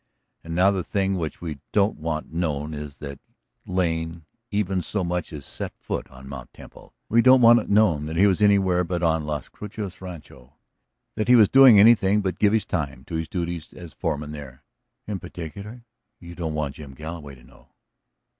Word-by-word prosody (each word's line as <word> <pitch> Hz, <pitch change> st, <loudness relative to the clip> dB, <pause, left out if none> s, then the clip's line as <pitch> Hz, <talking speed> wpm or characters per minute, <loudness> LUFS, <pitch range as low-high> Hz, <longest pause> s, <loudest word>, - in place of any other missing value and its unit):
And 85 Hz, 0 st, -6 dB
now 95 Hz, +3 st, +5 dB
the 95 Hz, -3 st, -2 dB
thing 95 Hz, 0 st, 0 dB
which 80 Hz, -2 st, -5 dB
we 80 Hz, -5 st, -5 dB
don't 100 Hz, -5 st, +1 dB
want 80 Hz, 0 st, -4 dB
known 80 Hz, -3 st, -2 dB
is 75 Hz, -1 st, -7 dB
that 70 Hz, -2 st, -8 dB, 0.5 s
Lane 85 Hz, -3 st, -2 dB, 0.2 s
even 100 Hz, -3 st, 0 dB
so 95 Hz, +3 st, -2 dB
much 90 Hz, 0 st, -3 dB
as 75 Hz, -3 st, -8 dB
set -, -, -6 dB
foot -, -, -5 dB
on 65 Hz, +1 st, -13 dB
Mt. 65 Hz, -3 st, -9 dB
Temple. -, -, -15 dB
We 115 Hz, +2 st, +4 dB
don't 130 Hz, +1 st, +6 dB
want 120 Hz, +1 st, +8 dB
it -, -, -7 dB
known 95 Hz, -8 st, +3 dB
that 80 Hz, +1 st, -5 dB
he 95 Hz, +4 st, +5 dB
was 100 Hz, 0 st, +2 dB
anywhere 95 Hz, -3 st, +4 dB
but 90 Hz, 0 st, -3 dB
on 80 Hz, -2 st, +1 dB
Las 75 Hz, -2 st, -3 dB
Cruces 105 Hz, -3 st, -8 dB
Rancho; 75 Hz, -8 st, -11 dB, 0.6 s
that 110 Hz, +1 st, -2 dB
he 125 Hz, -, +7 dB
was 110 Hz, -4 st, +6 dB
doing 130 Hz, -5 st, +8 dB
anything 105 Hz, -2 st, +5 dB
but 95 Hz, -2 st, -3 dB
give 105 Hz, -, +4 dB
his 110 Hz, -1 st, +1 dB
time 70 Hz, -7 st, -3 dB
to -, -, -11 dB
his 80 Hz, 0 st, -2 dB
duties 85 Hz, -3 st, -4 dB
as 85 Hz, -3 st, -11 dB
foreman 75 Hz, -4 st, -3 dB
there." 70 Hz, -4 st, -10 dB, 0.4 s
"In 105 Hz, -3 st, -4 dB
particular 100 Hz, +8 st, -9 dB, 0.3 s
you 85 Hz, -1 st, -10 dB
don't 80 Hz, -3 st, -4 dB
want 75 Hz, -3 st, -3 dB
Jim 70 Hz, -3 st, -10 dB
Galloway 75 Hz, -2 st, -8 dB
to 65 Hz, -, -19 dB
know?" 60 Hz, -1 st, -20 dB
85 Hz, 190 wpm, -24 LUFS, 75-100 Hz, 0.6 s, want